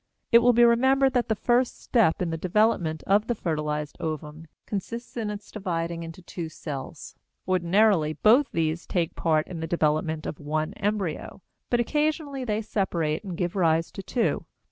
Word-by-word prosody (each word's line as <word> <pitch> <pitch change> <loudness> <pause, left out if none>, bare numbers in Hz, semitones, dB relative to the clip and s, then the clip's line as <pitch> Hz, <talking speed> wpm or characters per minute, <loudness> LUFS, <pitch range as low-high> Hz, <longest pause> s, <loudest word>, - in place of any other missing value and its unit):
It 235 - +9
will 245 +1 +5
be 240 +1 +5
remembered 265 +3 +4
that 245 -2 +1
the 220 - +1
first 245 +3 +1
step 215 -8 +2
in 170 - -2
the - - -1
development 175 -3 +1
of 205 +3 +3
the 240 - 0
fertilized 150 -5 -3
ovum 155 0 -5 0.2
consists 230 +4 -5
in 225 -3 -2
its 210 0 -7
dividing 170 -4 -3
into 165 +2 -9
two 170 -2 -6
cells. 145 -3 -7 0.3
Ordinarily, 185 -2 +3
both 235 - +4
these 160 +1 -1
take 170 -3 -1
part 155 -2 +1
in 175 -3 -7
the 160 - -3
development 155 -1 0
of 150 - -5
one 155 +1 -2
embryo, 195 -3 -3 0.3
but 240 - +2
occasionally 295 +1 0
they 220 -2 -1
separate 170 -7 -1
and 185 -4 -6
give 175 0 -2
rise 165 -3 +2
to 195 - -7
two. 235 +4 -1
180 Hz, 170 wpm, -26 LUFS, 160-225 Hz, 0.3 s, It